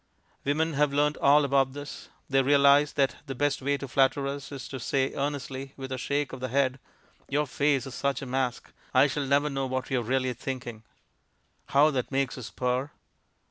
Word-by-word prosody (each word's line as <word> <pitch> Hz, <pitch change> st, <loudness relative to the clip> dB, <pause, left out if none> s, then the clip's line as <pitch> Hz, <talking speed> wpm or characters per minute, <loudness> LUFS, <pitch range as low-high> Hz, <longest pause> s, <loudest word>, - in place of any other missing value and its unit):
Women 155 Hz, +3 st, 0 dB
have 145 Hz, 0 st, +2 dB
learnt 145 Hz, +1 st, +2 dB
all 145 Hz, +1 st, +5 dB
about 135 Hz, -1 st, +2 dB
this. 145 Hz, 0 st, -8 dB, 0.2 s
They 135 Hz, 0 st, +3 dB
realize 140 Hz, +1 st, +5 dB
that 135 Hz, -2 st, +1 dB
the 135 Hz, -, -4 dB
best 145 Hz, +1 st, 0 dB
way 140 Hz, +2 st, 0 dB
to 140 Hz, -, -6 dB
flatter 135 Hz, +2 st, +2 dB
us 140 Hz, +1 st, -5 dB
is 135 Hz, -3 st, -7 dB
to 135 Hz, -, -6 dB
say 135 Hz, +2 st, 0 dB
earnestly, 140 Hz, -1 st, -4 dB
with 135 Hz, -1 st, -7 dB
a 130 Hz, -, -3 dB
shake 145 Hz, +2 st, -1 dB
of 130 Hz, -, -6 dB
the 130 Hz, -, -3 dB
head, 130 Hz, +1 st, +1 dB, 0.5 s
"Your 150 Hz, +2 st, +1 dB
face 140 Hz, -1 st, +1 dB
is 135 Hz, -, -8 dB
such 140 Hz, +1 st, -1 dB
a -, -, -5 dB
mask; 130 Hz, -1 st, -2 dB, 0.2 s
I 130 Hz, +2 st, +7 dB
shall 140 Hz, 0 st, -2 dB
never 140 Hz, +2 st, +3 dB
know 135 Hz, -2 st, -2 dB
what 130 Hz, +1 st, -3 dB
you're 130 Hz, -2 st, +1 dB
really 130 Hz, +2 st, 0 dB
thinking." 125 Hz, -2 st, -6 dB, 0.9 s
How 145 Hz, +3 st, +4 dB
that 130 Hz, -4 st, -2 dB
makes 135 Hz, -1 st, 0 dB
us 125 Hz, -4 st, -7 dB
purr! 125 Hz, +2 st, -1 dB
135 Hz, 195 wpm, -27 LUFS, 130-145 Hz, 0.9 s, I